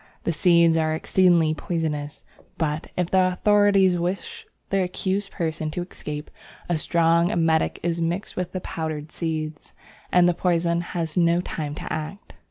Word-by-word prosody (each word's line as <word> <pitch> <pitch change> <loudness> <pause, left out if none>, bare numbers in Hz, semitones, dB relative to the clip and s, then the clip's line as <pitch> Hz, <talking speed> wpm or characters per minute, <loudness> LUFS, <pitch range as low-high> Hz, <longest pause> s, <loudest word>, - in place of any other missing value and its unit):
The 170 - 0
seeds 170 0 +4
are 155 -1 +1
exceedingly 170 -2 +3
poisonous, 155 -3 -3 0.3
but, 155 -1 -2
if 180 -1 -1
the 185 -1 +4
authorities 200 -2 +4
wish 180 +3 -4 0.2
the 195 -1 +2
accused 190 +2 -2
person 160 -3 -3
to 175 +3 -3
escape, 150 -4 -7 0.4
a 175 -3 0
strong 170 +2 +3
emetic 165 -1 +1
is 170 0 -1
mixed 175 +5 -2
with 180 -1 -3
the 185 - -4
powdered 155 -2 -5
seeds, 155 -2 -4 0.4
and 180 -1 +5
the 175 - +3
poison 170 -1 +1
has 170 -1 -4
no 170 0 +4
time 150 -4 -4
to - - -5
act. 155 +6 -6
170 Hz, 155 wpm, -24 LUFS, 160-180 Hz, 0.4 s, and